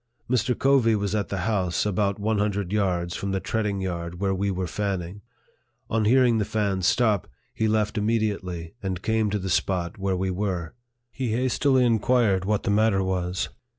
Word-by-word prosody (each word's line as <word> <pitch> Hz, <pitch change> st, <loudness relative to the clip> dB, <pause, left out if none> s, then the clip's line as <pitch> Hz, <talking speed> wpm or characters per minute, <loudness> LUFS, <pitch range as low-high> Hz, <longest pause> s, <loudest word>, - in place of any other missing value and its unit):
Mr. 125 Hz, 0 st, +1 dB
Covey 130 Hz, -5 st, +4 dB
was 100 Hz, -1 st, -1 dB
at 105 Hz, -2 st, -1 dB
the 95 Hz, -2 st, -2 dB
house, 95 Hz, -5 st, 0 dB
about 100 Hz, 0 st, 0 dB
one 105 Hz, +1 st, 0 dB
hundred 100 Hz, -2 st, -1 dB
yards 90 Hz, -4 st, 0 dB
from 100 Hz, -, -3 dB
the 95 Hz, 0 st, 0 dB
treading 105 Hz, -2 st, -2 dB
yard 85 Hz, -2 st, -4 dB
where 100 Hz, -1 st, +1 dB
we 100 Hz, +1 st, -1 dB
were 95 Hz, -1 st, -2 dB
fanning. 95 Hz, +1 st, -3 dB, 0.7 s
On 110 Hz, -1 st, +1 dB
hearing 120 Hz, 0 st, +4 dB
the -, -, +2 dB
fan 100 Hz, -3 st, -1 dB
stop, 105 Hz, +1 st, +2 dB, 0.3 s
he 110 Hz, -, 0 dB
left 110 Hz, 0 st, +1 dB
immediately, 100 Hz, -6 st, -1 dB
and 95 Hz, -2 st, -4 dB
came 110 Hz, -1 st, +1 dB
to 105 Hz, -, 0 dB
the 95 Hz, -1 st, -4 dB
spot 90 Hz, +2 st, -1 dB
where 95 Hz, -1 st, 0 dB
we 95 Hz, +1 st, -1 dB
were. 90 Hz, -3 st, -3 dB, 0.4 s
He 125 Hz, -4 st, -2 dB
hastily 130 Hz, +2 st, +2 dB
inquired 110 Hz, -4 st, +2 dB
what 105 Hz, 0 st, 0 dB
the -, -, 0 dB
matter 105 Hz, -2 st, +3 dB
was. 90 Hz, -1 st, -2 dB
100 Hz, 180 wpm, -25 LUFS, 95-110 Hz, 0.7 s, Covey